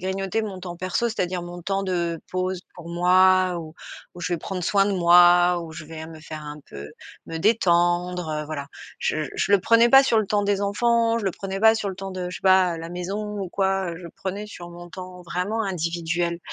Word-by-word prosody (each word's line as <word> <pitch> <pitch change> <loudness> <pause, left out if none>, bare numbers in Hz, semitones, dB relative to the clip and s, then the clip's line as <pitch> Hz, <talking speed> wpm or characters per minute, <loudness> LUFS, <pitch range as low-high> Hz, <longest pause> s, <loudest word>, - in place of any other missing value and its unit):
grignoter 195 +3 -2
mon 195 -4 -6
temps 175 -1 -7
perso. 185 +6 -1
C'est-à-dire 180 -5 -2
mon 175 0 -8
temps 195 +2 -1
de 170 -3 -1
pause 185 0 -2
pour 170 -1 -10
moi, 185 +1 +4
où 160 -1 -10 0.4
où 175 - -10
je 175 - -2
vais 175 - 0
prendre 185 +2 -5
soin 195 +2 +3
de 205 - 0
moi, 175 0 +6
où 160 - -9
je 155 -1 -8
vais 160 0 -8
me 160 -1 -11
faire 155 0 -8
un 150 0 -8
peu 70 +1 -9 0.4
me 165 - -5
détendre, 175 -5 +1
voilà. 145 -2 -5 0.3
Je 155 0 -1
je - - -1
le 200 - +7
prenais 230 +4 +5
pas 270 +2 +9
sur 230 -4 +3
le 215 - -3
temps 205 +1 +1
des 200 -1 +1
enfants. 230 +3 +2
Je 210 - -5
le 190 - 0
prenais 195 +1 -5
pas 220 +1 +6
sur 215 -2 -2
le 190 - -8
temps 195 0 -6
de 180 -1 -4
je - - -6
sais - - -27
pas, 185 -2 +4
la 165 0 -7
maison 200 +4 -4
ou 190 - -4
quoi. 190 -3 0
Je 175 0 -9
prenais 195 +5 -6
sur 175 -4 -10
mon 175 0 -11
temps 180 0 -9
vraiment 185 +6 -2
individuel 170 -1 -2
180 Hz, 220 wpm, -24 LUFS, 170-195 Hz, 0.4 s, pas